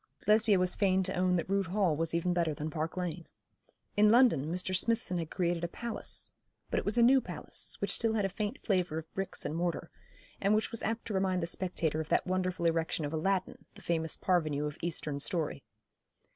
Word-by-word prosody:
Lesbia 215 Hz, -1 st, +4 dB
was 180 Hz, 0 st, +3 dB
fain 190 Hz, -2 st, +2 dB
to 190 Hz, -, +2 dB
own 180 Hz, 0 st, +2 dB
that 170 Hz, -, -1 dB
Rood 195 Hz, -1 st, 0 dB
Hall 185 Hz, -3 st, +1 dB
was 165 Hz, +2 st, -1 dB
even 175 Hz, +1 st, +1 dB
better 170 Hz, -3 st, 0 dB
than 155 Hz, +2 st, -4 dB
Park 160 Hz, +3 st, -3 dB
Lane. 175 Hz, -2 st, -4 dB, 0.7 s
In 210 Hz, 0 st, +5 dB
London 225 Hz, -, +4 dB
Mr. 185 Hz, +1 st, -1 dB
Smithson 205 Hz, -2 st, +1 dB
had 165 Hz, -2 st, -4 dB
created 175 Hz, -2 st, -1 dB
a -, -, +1 dB
palace; 235 Hz, +6 st, -3 dB, 0.4 s
but -, -, +2 dB
it -, -, -6 dB
was 205 Hz, +3 st, +2 dB
a 235 Hz, -, +6 dB
new 260 Hz, +2 st, +6 dB
palace, -, -, -4 dB
which -, -, +1 dB
still 225 Hz, -1 st, +3 dB
had 205 Hz, -3 st, +1 dB
a -, -, 0 dB
faint 205 Hz, +2 st, -3 dB
flavour 180 Hz, -5 st, +1 dB
of 160 Hz, 0 st, -7 dB
bricks 195 Hz, 0 st, -3 dB
and 155 Hz, -, -2 dB
mortar, 170 Hz, 0 st, -2 dB, 0.5 s
and 200 Hz, +2 st, +3 dB
which 215 Hz, +1 st, 0 dB
was 230 Hz, -, -2 dB
apt 225 Hz, +1 st, -2 dB
to 220 Hz, -, -4 dB
remind 190 Hz, -2 st, +1 dB
the -, -, +1 dB
spectator 165 Hz, -3 st, -1 dB
of 160 Hz, -, -8 dB
that -, -, +2 dB
wonderful 185 Hz, -1 st, -1 dB
erection 165 Hz, -1 st, 0 dB
of 145 Hz, -, -4 dB
Aladdin, 185 Hz, +4 st, -1 dB
the -, -, -14 dB
famous 160 Hz, -2 st, 0 dB
Parvenu 155 Hz, -5 st, +1 dB
of 150 Hz, 0 st, -4 dB
Eastern 155 Hz, -4 st, -3 dB
story. 150 Hz, -, -2 dB
180 Hz, 215 wpm, -31 LUFS, 165-195 Hz, 0.7 s, a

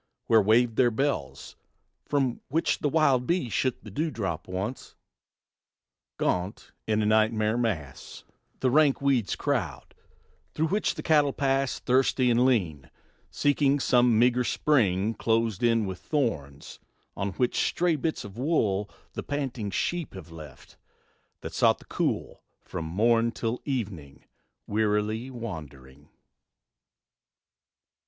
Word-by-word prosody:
Where 115 Hz, -1 st, +5 dB
waved 115 Hz, +3 st, +3 dB
their 125 Hz, -2 st, +5 dB
bells, 120 Hz, -, -3 dB, 0.5 s
from 135 Hz, -4 st, 0 dB
which 160 Hz, +4 st, 0 dB
the 145 Hz, -, 0 dB
wild 135 Hz, -5 st, +2 dB
bee 170 Hz, -7 st, 0 dB
shook 130 Hz, +2 st, -1 dB
The 110 Hz, -, -10 dB
dew 155 Hz, -, -1 dB
drop 95 Hz, -, -4 dB
once, 95 Hz, +7 st, -5 dB, 1.2 s
gaunt, 90 Hz, +3 st, -2 dB, 0.2 s
in 110 Hz, 0 st, +1 dB
a -, -, 0 dB
nightmare 110 Hz, 0 st, +2 dB
mass, 80 Hz, -, -4 dB, 0.4 s
The 130 Hz, -, +2 dB
rank 145 Hz, -1 st, +4 dB
weeds 135 Hz, -7 st, +1 dB
crowd; -, -, -3 dB, 0.6 s
through 160 Hz, +1 st, 0 dB
which 210 Hz, +3 st, 0 dB
the -, -, -6 dB
cattle 150 Hz, -4 st, +3 dB
pass, 135 Hz, -1 st, 0 dB
Thirsty 130 Hz, 0 st, +2 dB
and 120 Hz, +2 st, +4 dB
lean, 85 Hz, -, 0 dB, 0.4 s
seeking 145 Hz, 0 st, +2 dB
some 125 Hz, -3 st, +3 dB
meagre 125 Hz, +2 st, +3 dB
spring, 110 Hz, -7 st, +1 dB
Closed 115 Hz, -2 st, 0 dB
in 115 Hz, -2 st, +2 dB
with 95 Hz, -2 st, -5 dB
thorns, 80 Hz, -, -3 dB, 0.4 s
on 100 Hz, 0 st, -3 dB
which 125 Hz, +3 st, 0 dB
stray 175 Hz, -2 st, +1 dB
bits 155 Hz, +2 st, -2 dB
of 105 Hz, +2 st, -10 dB
wool 105 Hz, -9 st, 0 dB, 0.2 s
The -, -, -4 dB
panting 130 Hz, -7 st, -3 dB
sheep 170 Hz, -, -2 dB
have 85 Hz, -3 st, -10 dB
left, 75 Hz, -5 st, -12 dB, 0.6 s
that -, -, -7 dB
sought -, -, +3 dB
the -, -, -18 dB
cool, -, -, -2 dB, 0.2 s
From 80 Hz, -, -6 dB
morn 115 Hz, +7 st, +2 dB
till 115 Hz, +2 st, -3 dB
evening 100 Hz, -, -5 dB, 0.4 s
wearily 110 Hz, +3 st, 0 dB
wandering. 75 Hz, -, -9 dB
115 Hz, 130 wpm, -27 LUFS, 100-135 Hz, 1.2 s, Where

